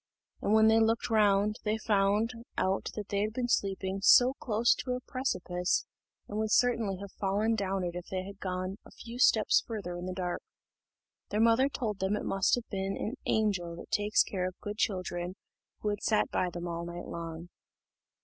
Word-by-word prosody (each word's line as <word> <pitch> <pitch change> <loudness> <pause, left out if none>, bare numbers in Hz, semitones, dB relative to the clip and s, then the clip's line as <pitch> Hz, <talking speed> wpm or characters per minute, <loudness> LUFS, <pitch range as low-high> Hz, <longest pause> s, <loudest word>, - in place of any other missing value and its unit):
And - - 0
when 220 0 +6
they 220 0 +5
looked 225 +1 +1
round, 210 -1 +3
they 215 +1 0
found 210 +1 +2 0.3
out 190 +1 0
that 210 -2 -6
they 200 0 0
had 215 +1 -1
been 245 0 -1
sleeping 195 -3 -1 0.4
close 230 0 +3
to 250 - -3
a 250 - -2
precipice, 185 -9 -1 0.4
and 210 - -4
would 220 0 0
certainly 230 -6 +2
have 200 0 -8
fallen 205 +3 0
down 195 -3 -1
it 175 -1 -2
if 180 0 -6
they 185 -1 -3
had 200 +1 -10
gone 185 +2 -3
a - - -15
few 235 +1 -10
steps 220 -4 +5
farther 200 -6 -5
in 175 +1 -5
the 185 - -3
dark. 180 -1 -3 0.9
Their 210 - -1
mother 230 +4 +4
told 220 -8 -3
them 190 +2 +1
it - - -4
must 195 -1 +2
have 245 -1 -6
been 195 -1 -2
the 230 - -3 0.2
angel 190 -6 0
that - - -11
takes 210 +1 +3
care 185 -2 -2
of 185 - -8
good 205 0 -6
children 180 -2 -1 0.5
who 210 - 0
had 205 0 -2
sat 215 - +1
by 180 - +1
them 175 0 -6
all 170 0 -3
night 175 0 -6
long. 170 0 -6
200 Hz, 195 wpm, -30 LUFS, 185-220 Hz, 0.9 s, when